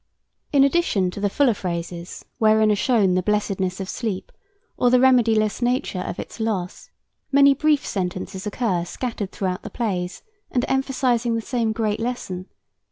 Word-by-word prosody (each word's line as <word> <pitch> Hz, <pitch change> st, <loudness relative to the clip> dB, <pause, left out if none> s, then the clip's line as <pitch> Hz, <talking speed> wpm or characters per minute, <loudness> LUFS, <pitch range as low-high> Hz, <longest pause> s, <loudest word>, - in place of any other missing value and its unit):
In 280 Hz, -2 st, +5 dB
addition 275 Hz, -, +2 dB
to 200 Hz, -, -7 dB
the 205 Hz, 0 st, +1 dB
fuller 265 Hz, +2 st, +3 dB
phrases 175 Hz, -2 st, -5 dB
wherein 215 Hz, -1 st, +4 dB
are -, -, +3 dB
shown 205 Hz, -3 st, +2 dB
the 185 Hz, -, +2 dB
blessedness 195 Hz, -2 st, -1 dB
of 190 Hz, -, -4 dB
sleep, 205 Hz, -3 st, -4 dB, 0.4 s
or 245 Hz, -, +3 dB
the 250 Hz, -, +5 dB
remediless 230 Hz, -4 st, +3 dB
nature 245 Hz, -6 st, 0 dB
of 180 Hz, -, -5 dB
its -, -, -8 dB
loss, 205 Hz, -5 st, -3 dB, 0.4 s
many 280 Hz, 0 st, +6 dB
brief 300 Hz, +1 st, +2 dB
sentences 185 Hz, +1 st, -4 dB
occur 200 Hz, -5 st, 0 dB
scattered 210 Hz, +1 st, -4 dB
throughout 185 Hz, -2 st, -2 dB
the -, -, -7 dB
plays, 185 Hz, -6 st, -3 dB, 0.3 s
and 245 Hz, +1 st, 0 dB
emphasizing 255 Hz, -3 st, +1 dB
the -, -, 0 dB
same 235 Hz, -3 st, 0 dB
great 220 Hz, -1 st, -1 dB
lesson. 215 Hz, -6 st, -4 dB
215 Hz, 160 wpm, -23 LUFS, 185-250 Hz, 0.4 s, many